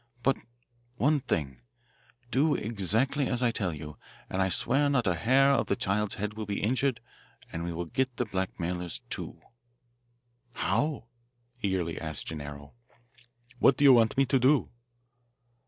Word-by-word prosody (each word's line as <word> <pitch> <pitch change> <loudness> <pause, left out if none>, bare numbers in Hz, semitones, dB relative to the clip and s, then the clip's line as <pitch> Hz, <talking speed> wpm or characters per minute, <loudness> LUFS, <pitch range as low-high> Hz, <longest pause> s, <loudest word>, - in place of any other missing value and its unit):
"But 135 +2 +3 0.6
one 145 +5 +2
thing 70 - -3 0.7
do 145 +5 +3
exactly 115 - 0
as 125 0 -1
I 120 - +3
tell 100 -6 -1
you, 75 -1 -8 0.3
and 95 - 0
I 95 - +2
swear 140 +9 +2
not 140 -4 +2
a 90 - +3
hair 130 +10 +4
of 135 - +2
the - - +1
child's 100 +2 -1
head 105 0 -3
will 110 -1 -6
be 100 - -2
injured 125 +2 +1 0.5
and 85 - -4
we 85 - -3
will 85 +1 -3
get 130 +8 -1
the 125 - 0
blackmailers, 90 -3 -3
too." - - -5 1.1
"How?" 145 -1 0 0.6
eagerly 95 -4 -1
asked 80 -2 -4
Gennaro. 70 -2 -7 0.9
"What 130 - +5
do - - +1
you 140 -2 +9
want 115 +1 +4
me 135 - +5
to 135 +1 +2
do?" 130 +3 +3
110 Hz, 155 wpm, -29 LUFS, 90-130 Hz, 1.1 s, you